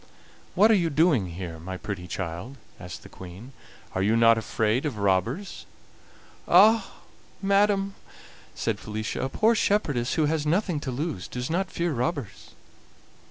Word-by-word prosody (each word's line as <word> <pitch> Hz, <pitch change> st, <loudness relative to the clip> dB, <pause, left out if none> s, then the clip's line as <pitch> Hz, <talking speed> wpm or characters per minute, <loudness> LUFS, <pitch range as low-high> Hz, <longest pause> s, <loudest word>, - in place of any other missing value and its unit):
"What 210 Hz, +4 st, +6 dB
are -, -, +6 dB
you 170 Hz, -4 st, +1 dB
doing 145 Hz, -, +3 dB
here, 85 Hz, -1 st, -7 dB
my 95 Hz, +3 st, -6 dB
pretty 90 Hz, -2 st, -6 dB
child?" 90 Hz, +9 st, -5 dB, 0.2 s
asked 90 Hz, -2 st, -9 dB
the -, -, -11 dB
Queen. 95 Hz, +9 st, -11 dB, 0.4 s
"Are 95 Hz, -, -1 dB
you 110 Hz, +4 st, +3 dB
not 115 Hz, 0 st, +6 dB
afraid 110 Hz, +2 st, 0 dB
of 145 Hz, -8 st, -3 dB
robbers?" 100 Hz, -, -1 dB, 0.8 s
"Ah! 215 Hz, +6 st, +5 dB, 0.4 s
madam," 200 Hz, 0 st, +2 dB, 0.6 s
said -, -, -2 dB
Felicia, 110 Hz, +1 st, -4 dB
"a 130 Hz, -, -1 dB
poor 220 Hz, -, +3 dB
shepherdess 150 Hz, -, +1 dB
who 155 Hz, -, +2 dB
has 155 Hz, 0 st, 0 dB
nothing 170 Hz, +1 st, 0 dB
to 145 Hz, -, -5 dB
lose 135 Hz, -, -3 dB
does 125 Hz, +3 st, -4 dB
not 190 Hz, +3 st, 0 dB
fear 170 Hz, -1 st, -1 dB
robbers." 125 Hz, -, -4 dB
130 Hz, 150 wpm, -26 LUFS, -, 0.8 s, What